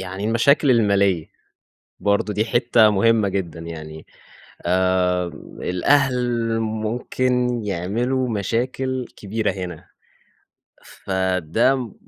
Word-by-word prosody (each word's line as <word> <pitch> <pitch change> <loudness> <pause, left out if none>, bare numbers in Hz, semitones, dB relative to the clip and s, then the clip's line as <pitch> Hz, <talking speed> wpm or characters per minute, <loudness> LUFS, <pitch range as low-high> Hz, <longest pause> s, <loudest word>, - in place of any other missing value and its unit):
يعني 95 +2 -6
المشاكل 130 +5 +3
المالية، 100 -7 +2 0.7
برضه 100 +1 +1
دي 110 +2 0
حتة 120 -2 +4
مهمة 105 0 +3
جدًا 85 -4 -4
يعني. 80 -1 -8 0.6
آآ 90 0 +1 0.3
الأهل 120 +2 +1
ممكن 120 +2 -1
يعملوا 120 +8 -1
مشاكل 125 +5 -2
كبيرة 105 +1 -2
هنا. 90 -2 -7 1.0
فده 95 - 0
م 125 -6 -5
110 Hz, 90 wpm, -21 LUFS, 95-120 Hz, 1.0 s, حتة